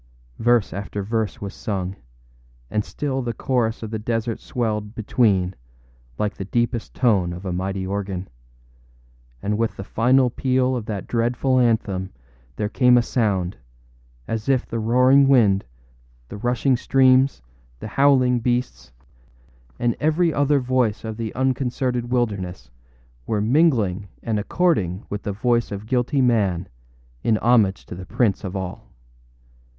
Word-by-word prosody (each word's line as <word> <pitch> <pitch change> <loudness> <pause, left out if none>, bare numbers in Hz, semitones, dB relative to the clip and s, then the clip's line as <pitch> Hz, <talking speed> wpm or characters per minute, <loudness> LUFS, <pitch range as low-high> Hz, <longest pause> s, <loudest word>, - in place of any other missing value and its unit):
Verse 120 -2 +2
after 100 +1 -4
verse 110 +1 -2
was 100 0 -5
sung; 95 -2 -4 0.8
and 105 - 0
still 135 +1 -3
the 120 -2 -3
chorus 115 -3 -1
of 110 - -6
the 110 - -3
desert 115 +1 -2
swelled 105 -3 -3
between 100 -5 +1 0.6
like 105 -1 -1
the 95 - -5
deepest 120 +2 -1
tone 100 -9 +2
of 90 +3 -8
a 90 - -2
mighty 95 +1 -2
organ; 95 -1 -3 1.2
and 105 +1 -1
with 115 -1 -1
the 100 - -5
final 125 +5 +3
peal 130 0 +1
of 115 -4 -4
that 105 -3 -4
dreadful 125 +2 +1
anthem 105 -6 +1 0.5
there 105 - -1
came 125 +2 +4
a 120 - +3
sound, 100 -7 0 0.7
as 115 +3 -3
if 130 -2 +2
the 115 - -4
roaring 125 +5 +5
wind, 110 -8 +4 0.6
the - - -7
rushing 125 +4 +1
streams, 130 - +3 0.4
the - - -7
howling 130 -3 +3
beasts, 120 - -2 0.9
and 120 -1 0
every 160 +2 +2
other 145 0 +2
voice 125 -4 0
of 110 -1 -5
the 115 -2 -3
unconcerted 125 -2 -1
wilderness 95 - -2 0.6
were 110 - 0
mingling 110 - +2 0.2
and 110 -2 -1
according 105 - 0
with 105 0 -3
the 105 - -3
voice 120 +3 0
of 100 +1 -5
guilty 125 +4 +1
man 100 -8 +1 0.5
in 110 - +2
homage 110 -5 +2
to - - -9
the 90 +1 -8
prince 115 -4 +1
of 95 -1 -5
all. 95 -2 -6
115 Hz, 145 wpm, -22 LUFS, 100-125 Hz, 1.2 s, roaring